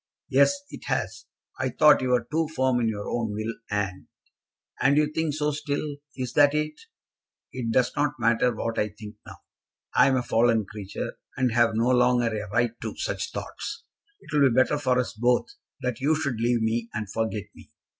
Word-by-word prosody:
"Yes, 140 Hz, -, +4 dB
it -, -, -9 dB
has. -, -, -2 dB, 0.3 s
I -, -, 0 dB
thought 150 Hz, -1 st, +5 dB
you 130 Hz, -, -1 dB
were 125 Hz, -2 st, +2 dB
too 160 Hz, +1 st, +1 dB
firm 130 Hz, -5 st, +1 dB
in 115 Hz, -, +1 dB
your 105 Hz, -2 st, -3 dB
own 115 Hz, -3 st, -2 dB
will, 110 Hz, +2 st, -3 dB, 0.2 s
and 95 Hz, -3 st, -2 dB, 0.4 s
" -, -, -21 dB
"And 140 Hz, +2 st, +4 dB
you 150 Hz, 0 st, +2 dB
think 160 Hz, -2 st, -1 dB
so 150 Hz, 0 st, 0 dB
still. 145 Hz, 0 st, -3 dB, 0.2 s
Is 125 Hz, -2 st, -4 dB
that 145 Hz, 0 st, +5 dB
it?" 150 Hz, 0 st, 0 dB, 0.8 s
"It 125 Hz, -3 st, -3 dB
does 125 Hz, +2 st, +2 dB
not 145 Hz, 0 st, +1 dB
matter 120 Hz, +2 st, +3 dB
what 115 Hz, 0 st, -3 dB
I 105 Hz, -, +1 dB
think 105 Hz, 0 st, -11 dB
now. -, -, -9 dB, 0.6 s
I -, -, +6 dB
am 135 Hz, -, +3 dB
a 125 Hz, -, 0 dB
fallen 115 Hz, -2 st, +2 dB
creature, 100 Hz, -1 st, -6 dB, 0.2 s
and 130 Hz, -2 st, +2 dB
have 115 Hz, -1 st, +3 dB
no 115 Hz, +3 st, +2 dB
longer 125 Hz, -2 st, +3 dB
a 105 Hz, -1 st, -5 dB
right 115 Hz, +2 st, +1 dB
to -, -, -5 dB
such -, -, -3 dB
thoughts. -, -, -6 dB, 0.4 s
It -, -, -12 dB
will 140 Hz, -2 st, +5 dB
be 115 Hz, -, -1 dB
better 130 Hz, +3 st, +3 dB
for 130 Hz, -3 st, +1 dB
us 125 Hz, -2 st, -1 dB
both 120 Hz, +2 st, +2 dB, 0.4 s
that 125 Hz, -2 st, -2 dB
you 150 Hz, +4 st, +3 dB
should 140 Hz, -7 st, -2 dB
leave 120 Hz, -1 st, +2 dB
me, 115 Hz, +1 st, -1 dB
and 110 Hz, -1 st, -3 dB
forget 110 Hz, -2 st, -2 dB
me. -, -, -16 dB
125 Hz, 200 wpm, -26 LUFS, 115-140 Hz, 0.8 s, I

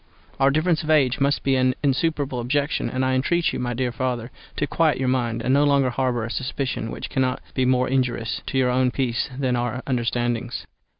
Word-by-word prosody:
Our 135 Hz, 0 st, +5 dB
difference 155 Hz, +3 st, +1 dB
of 155 Hz, -, -6 dB
age 135 Hz, -5 st, +3 dB
must 140 Hz, +1 st, +1 dB
be 135 Hz, -1 st, +2 dB
an 130 Hz, 0 st, +2 dB
insuperable 140 Hz, -1 st, 0 dB
objection, 140 Hz, +5 st, 0 dB
and 130 Hz, 0 st, -1 dB
I 130 Hz, -, +1 dB
entreat 165 Hz, +7 st, +1 dB
you, -, -, -3 dB
my 120 Hz, -1 st, -2 dB
dear 125 Hz, 0 st, -1 dB
father, 120 Hz, 0 st, -3 dB, 0.3 s
to 145 Hz, -, +1 dB
quiet 160 Hz, +1 st, +2 dB
your 130 Hz, -, -1 dB
mind, 120 Hz, -3 st, 0 dB
and 130 Hz, -, +2 dB
no 140 Hz, +1 st, +4 dB
longer 140 Hz, -3 st, +3 dB
harbour 125 Hz, -2 st, 0 dB
a 115 Hz, -, -5 dB
suspicion 130 Hz, -3 st, -3 dB
which -, -, -6 dB
cannot 130 Hz, -1 st, 0 dB
be 130 Hz, -, +1 dB
more 125 Hz, 0 st, +2 dB
injurious 120 Hz, -5 st, -1 dB
to 135 Hz, -, -2 dB
your 125 Hz, -1 st, +3 dB
own 130 Hz, 0 st, +2 dB
peace 125 Hz, -2 st, -1 dB
than 130 Hz, -2 st, 0 dB
to 120 Hz, -, +1 dB
our 120 Hz, +1 st, -3 dB
understandings. 120 Hz, -2 st, -1 dB
130 Hz, 215 wpm, -23 LUFS, 125-140 Hz, 0.3 s, Our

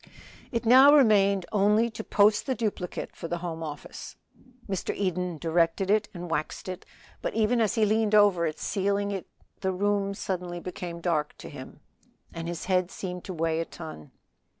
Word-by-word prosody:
It 235 Hz, 0 st, -2 dB
now 265 Hz, +5 st, +8 dB
remained 200 Hz, -8 st, +4 dB
only 210 Hz, +3 st, +3 dB
to 220 Hz, 0 st, -6 dB
post 210 Hz, +3 st, +3 dB
the 260 Hz, -, 0 dB
duplicate 205 Hz, -6 st, -4 dB
for -, -, -6 dB
the 175 Hz, -, -2 dB
Home 170 Hz, -2 st, -5 dB
Office. 150 Hz, -2 st, -7 dB, 0.5 s
Mr. 190 Hz, -3 st, -2 dB
Eden 180 Hz, -3 st, -2 dB
directed 165 Hz, +4 st, +1 dB
it 210 Hz, 0 st, +2 dB
and 175 Hz, -1 st, -7 dB
waxed 160 Hz, +2 st, -3 dB
it, 185 Hz, 0 st, -6 dB, 0.3 s
but -, -, -3 dB
even 225 Hz, +2 st, +2 dB
as 220 Hz, +1 st, +1 dB
he 220 Hz, -2 st, +3 dB
leaned 215 Hz, 0 st, +2 dB
over 200 Hz, -5 st, +5 dB
it 155 Hz, -, -4 dB
sealing 200 Hz, +1 st, -1 dB
it 195 Hz, -2 st, -4 dB, 0.3 s
the 190 Hz, -, 0 dB
room 200 Hz, +1 st, 0 dB
suddenly 180 Hz, -2 st, -4 dB
became 175 Hz, -1 st, -6 dB
dark 155 Hz, -4 st, -1 dB
to -, -, -9 dB
him, -, -, -10 dB, 0.5 s
and 165 Hz, 0 st, -5 dB
his 170 Hz, -1 st, -5 dB
head 185 Hz, -1 st, +1 dB
seemed 180 Hz, -2 st, -6 dB
to 190 Hz, -, -5 dB
weigh 165 Hz, 0 st, 0 dB
a 165 Hz, -, -1 dB
ton. 155 Hz, -, -10 dB
190 Hz, 175 wpm, -27 LUFS, 170-210 Hz, 0.5 s, now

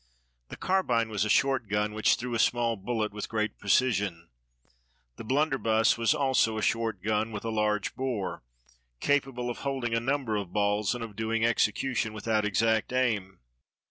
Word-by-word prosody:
The -, -, -8 dB
carbine 125 Hz, -12 st, +1 dB
was 105 Hz, -1 st, 0 dB
a -, -, -2 dB
short 135 Hz, +1 st, +2 dB
gun, 105 Hz, +1 st, 0 dB
which 110 Hz, 0 st, +3 dB
threw 120 Hz, 0 st, -5 dB
a 115 Hz, -, 0 dB
small 120 Hz, 0 st, +2 dB
bullet 110 Hz, +1 st, -2 dB
with 105 Hz, -, -5 dB
great 110 Hz, -1 st, -2 dB
precision. 100 Hz, -6 st, +1 dB, 0.9 s
The -, -, -7 dB
blunderbuss 130 Hz, -4 st, +2 dB
was 115 Hz, +5 st, +2 dB
also 130 Hz, -6 st, +2 dB
a 110 Hz, -, -2 dB
short 115 Hz, -5 st, -1 dB
gun, 110 Hz, +1 st, 0 dB
with 105 Hz, 0 st, -6 dB
a 115 Hz, -, -1 dB
large 105 Hz, -2 st, 0 dB
bore, 125 Hz, -7 st, -3 dB, 0.6 s
capable 135 Hz, -4 st, 0 dB
of -, -, -8 dB
holding 135 Hz, -4 st, -2 dB
a 115 Hz, -, +2 dB
number 130 Hz, -3 st, -1 dB
of 100 Hz, -4 st, -5 dB
balls, 105 Hz, +2 st, +1 dB
and 120 Hz, -, -5 dB
of 110 Hz, -3 st, -8 dB
doing 110 Hz, +1 st, 0 dB
execution 115 Hz, 0 st, 0 dB
without 110 Hz, 0 st, 0 dB
exact 110 Hz, +3 st, +1 dB
aim. 105 Hz, -7 st, -1 dB
110 Hz, 170 wpm, -28 LUFS, 105-125 Hz, 0.9 s, which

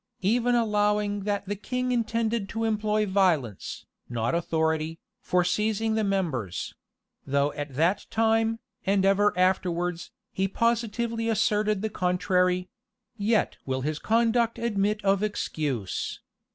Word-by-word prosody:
Even 240 Hz, +5 st, +2 dB
allowing 210 Hz, -2 st, +1 dB
that 205 Hz, -1 st, -1 dB
the 205 Hz, +1 st, -3 dB
king 250 Hz, +4 st, -2 dB
intended 230 Hz, -3 st, 0 dB
to 225 Hz, 0 st, -3 dB
employ 215 Hz, -1 st, +1 dB
violence, 180 Hz, -, 0 dB, 0.2 s
not 115 Hz, +1 st, -1 dB
authority, 160 Hz, -1 st, 0 dB, 0.2 s
for 180 Hz, 0 st, +2 dB
seizing 220 Hz, +3 st, 0 dB
the 220 Hz, 0 st, +1 dB
members; 160 Hz, -, -2 dB, 0.5 s
though 140 Hz, +1 st, +1 dB
at 145 Hz, -2 st, -6 dB
that 175 Hz, +7 st, +1 dB
time, 225 Hz, 0 st, +2 dB, 0.3 s
and 195 Hz, 0 st, +2 dB
ever 200 Hz, +1 st, +4 dB
afterwards, 180 Hz, -2 st, 0 dB, 0.2 s
he 190 Hz, +1 st, 0 dB
positively 230 Hz, +1 st, 0 dB
asserted 210 Hz, -1 st, +1 dB
the 220 Hz, -, 0 dB
contrary; 180 Hz, 0 st, +1 dB, 0.5 s
yet 215 Hz, 0 st, +1 dB
will 130 Hz, 0 st, -1 dB
his 150 Hz, +2 st, -2 dB
conduct 230 Hz, +1 st, +2 dB
admit 210 Hz, -2 st, 0 dB
of 195 Hz, 0 st, +3 dB
excuse. 145 Hz, -, -2 dB
200 Hz, 125 wpm, -27 LUFS, 175-220 Hz, 0.5 s, ever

